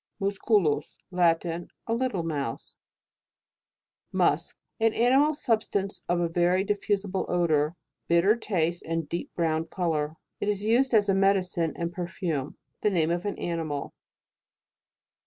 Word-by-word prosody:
MUSCULUS. 195 -6 +1
Latin. 170 -1 +1 0.2
A 230 - -1
little 230 -7 0
mouse. 145 -7 -4 1.4
MUSK. - - +1 0.2
An 225 0 +2
animal 270 +6 +4
substance 215 -6 -1
of 175 0 +2
a 170 - +1
very 175 +3 +2
diffusible 200 -1 -1
odour, 160 -3 +2 0.3
bitter 170 +6 +4
taste, 175 -7 -1
and 165 -1 -3
deep 170 +3 -4
brown 160 -1 0
colour. 160 -3 -1 0.2
It 205 - -1
is 205 -1 -1
used 240 +3 +3
as 210 -1 +4
a 195 - +3
medicine 190 -4 +2
and 170 0 -3
perfume. 170 -5 -3 0.2
The 210 - +3
name 165 -4 +1
of 175 +2 -1
an 205 - -3
animal. 160 -4 -3
175 Hz, 130 wpm, -27 LUFS, 165-205 Hz, 1.4 s, animal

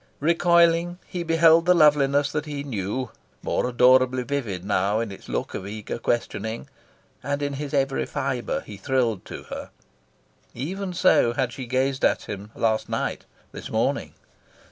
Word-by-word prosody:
Recoiling, 170 +2 +3
he 180 - -5
beheld 165 0 +4
the 180 - +6
loveliness 145 -3 +4
that 150 0 -3
he 145 -1 -4
knew 115 -1 -3 0.3
more - - 0
adorably 130 +1 +4
vivid 115 -9 -3
now 100 +1 +1
in 115 -3 -3
its 100 - -11
look - - -3
of 95 - -5
eager 105 +2 -5
questioning. 115 -1 -2 0.5
And 145 0 -2
in 145 0 -2
his 140 0 -5
every 135 -2 0
fibre 130 -3 -2
he 105 - -10
thrilled 115 -2 0
to - - -8
her. - - -6 0.9
Even 185 +9 -4
so 175 -9 +4
had 125 -1 -1
she 130 -2 -7
gazed 130 +2 0
at - - +2
him 100 +1 -7
last 110 -1 0
night, - - -3 0.3
this - - -8
morning. - - -1
130 Hz, 155 wpm, -24 LUFS, 115-150 Hz, 0.9 s, the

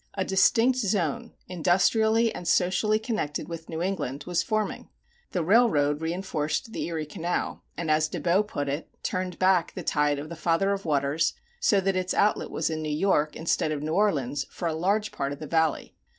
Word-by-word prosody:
A 190 - -1
distinct 225 +6 +3
zone, 190 - -1 0.2
industrially 220 +6 +2
and 175 - -7
socially 185 +5 +2
connected 215 - -3
with 165 -1 -8
New 160 +1 -3
England, 175 -8 -3
was 175 -1 0
forming. 215 -2 -2 0.4
The 180 - -1
railroad 155 -8 +3
reinforced 165 +2 -2
the - - -3
Erie 160 -2 -3
Canal 165 +4 -3 0.2
and, 165 -2 -1
as 155 0 +3
De - - -5
Bow 180 +3 +3
put 145 -9 -4
it, 145 +3 -3
turned 185 -1 -2
back 185 -2 +2
the - - -5
tide 150 -1 +1
of 145 +2 -6
the 170 - -6
Father 170 +4 +1
of 195 -1 -3
Waters 150 +2 +1 0.2
so 205 - +3
that 195 0 0
its 185 0 -1
outlet 210 +1 +2
was 160 0 -1
in 155 0 -3
New 155 - -3
York 150 -1 +1
instead 160 -1 0
of 150 -1 -3
New 155 +1 -2
Orleans 145 -9 +1
for 175 - -4
a 165 - -1
large 200 +7 0
part 140 0 -3
of - - -8
the 155 - -6
Valley. 160 0 0
170 Hz, 195 wpm, -26 LUFS, 155-195 Hz, 0.4 s, distinct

